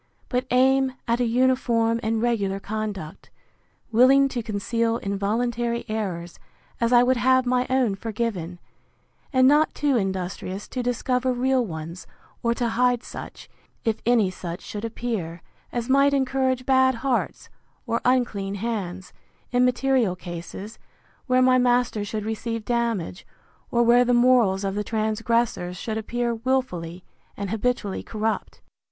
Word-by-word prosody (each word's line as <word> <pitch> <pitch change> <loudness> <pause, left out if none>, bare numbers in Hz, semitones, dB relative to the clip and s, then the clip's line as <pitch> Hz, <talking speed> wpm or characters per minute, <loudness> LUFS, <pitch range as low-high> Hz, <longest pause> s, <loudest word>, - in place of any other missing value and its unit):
but 250 0 -1
aim 265 +1 +3
at 235 +1 +1
an 245 - +2
uniform 235 -2 +2
and 225 0 -1
regular 200 -5 0
conduct, 205 -6 -5 0.6
willing 265 +4 +6
to 255 -3 -3
conceal 230 +2 -1
involuntary 235 +4 -1
errors, 185 -6 -4 0.4
as 235 0 +1
I 240 0 +6
would 255 0 +2
have 260 +1 +3
my 250 0 +1
own 260 -5 +2
forgiven; 195 -5 -3 0.7
and 260 -2 +5
not 300 +3 +4
too 285 -4 +2
industrious 190 0 -3
to 255 - -3
discover 250 +1 0
real 255 +1 +1
ones, 165 -2 -7 0.3
or 235 0 +1
to 240 -1 0
hide 245 +1 +2
such, - - -9 0.4
if 225 -1 0
any 225 -5 +3
such 175 -1 -7
should 210 0 -7
appear, 220 -8 -4 0.3
as 240 -1 -3
might 275 +1 +4
encourage 260 -1 0
bad 260 -1 +4
hearts, 255 +1 -2 0.4
or 230 -1 -1
unclean 230 -6 +1
hands, 190 -4 -4 0.4
in 250 0 +3
material 250 -5 +2
cases, 180 +4 -8 0.5
where 255 0 +4
my 255 0 +5
master 245 -3 +2
should 210 +1 -4
receive 225 0 -3
damage, 235 -5 -1 0.5
or 235 -1 +2
where 240 +1 +5
the 245 0 +2
morals 240 -6 +4
of 195 -1 -1
the 210 +1 -2
transgressors 220 -4 -1
should 220 +3 -4
appear 235 +2 -2
wilfully 220 -9 -2 0.3
and 200 -1 -4
habitually 220 -3 -1
corrupt. 220 0 -3
235 Hz, 140 wpm, -24 LUFS, 205-250 Hz, 0.7 s, willing